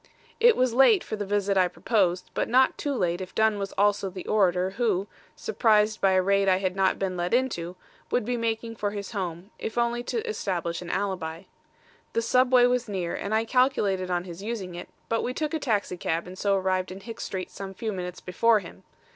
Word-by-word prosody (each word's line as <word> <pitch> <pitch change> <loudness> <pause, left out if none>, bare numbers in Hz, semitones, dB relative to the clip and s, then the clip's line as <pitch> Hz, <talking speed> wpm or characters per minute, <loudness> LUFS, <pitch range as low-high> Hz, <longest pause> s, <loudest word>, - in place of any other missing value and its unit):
"It 470 0 +6
was 255 -2 +2
late 270 - +5
for - - -4
the 205 -2 -4
visit 200 -1 +1
I 185 -1 +5
proposed, 180 -1 0
but - - -1
not 260 +2 +4
too 285 -2 -2
late, 175 -4 0
if 185 - -8
Dunn 220 -1 +2
was 195 0 -3
also 205 -1 +2
the 185 0 -8
orator 185 -3 +2
who, 200 -3 0 0.3
surprised 220 - +2
by 195 -1 +4
a 185 - +4
raid 195 0 +3
I 185 - +4
had 185 -1 -1
not 195 -1 +2
been 190 -2 -2
let 175 +5 0
into, 185 -9 -1 0.3
would 245 - 0
be 245 +2 -1
making 230 -1 -2
for 205 - -1
his 200 -1 -6
home, 185 -1 -5
if 225 - -5
only 235 0 +1
to 465 0 -3
establish 175 - -2
an 175 - -7
alibi. 180 -4 -3 0.7
The 230 - +1
subway 250 +1 +4
was 245 -2 +1
near, 180 -4 -2
and 200 - -4
I 220 +1 +1
calculated 220 -7 +1
on 175 -1 0
his 175 0 -9
using 205 -4 -4
it, 175 +1 -8 0.2
but 230 - 0
we 250 - -3
took 305 -1 -2
a 320 - 0
taxicab 190 - -1
and 180 +1 -9
so 200 +1 +1
arrived 185 -1 0
in 190 +1 -8
Hicks 225 +3 -7
Street 185 -1 -5
some 195 -1 -7
few 220 +2 -3
minutes 180 -1 -6
before 220 +5 +3
him. 185 -5 -8
200 Hz, 215 wpm, -26 LUFS, 185-230 Hz, 0.7 s, It